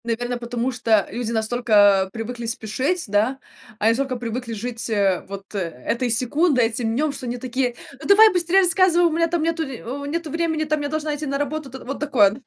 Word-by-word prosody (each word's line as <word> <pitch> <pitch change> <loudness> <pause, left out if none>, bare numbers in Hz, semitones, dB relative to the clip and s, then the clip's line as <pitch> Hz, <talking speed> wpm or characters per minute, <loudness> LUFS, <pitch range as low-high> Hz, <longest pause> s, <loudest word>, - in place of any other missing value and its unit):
Наверно, 240 +1 -2
потому 240 +1 -2
что 225 -4 +2
люди 235 +1 -3
настолько 215 -4 +3
привыкли 235 +2 -5
спешить, 255 - -2
да, 210 +6 +1 0.4
они 220 +1 +3
настолько 260 +2 -1
привыкли 240 0 -4
жить, 230 +2 -5
э, 200 -4 +1
вот 195 +1 -9
э 200 - -2 0.3
этой 245 +1 0
секундой, 255 +3 +2
этим 225 0 -2
днём, 300 +3 +1
что 275 -2 -6
они 240 +1 -3
такие: 250 0 -2 0.3
"Ну, - - -6
давай 425 +1 +7
быстрее 360 +2 +3
рассказывай, 350 -1 +4
у 335 - +3
меня 335 +1 +1
там 335 -1 -1
нету 330 0 0
в 270 0 -6
нету 320 0 -3
времени, 330 -1 0
там 305 -1 -1
я 290 - -2
должна 310 0 -2
идти 295 0 -5
на 275 0 -1
работу". 290 0 -3
Там 265 +1 -10
вот 275 +3 -5
такое 240 -10 +3
250 Hz, 200 wpm, -22 LUFS, 230-310 Hz, 0.4 s, давай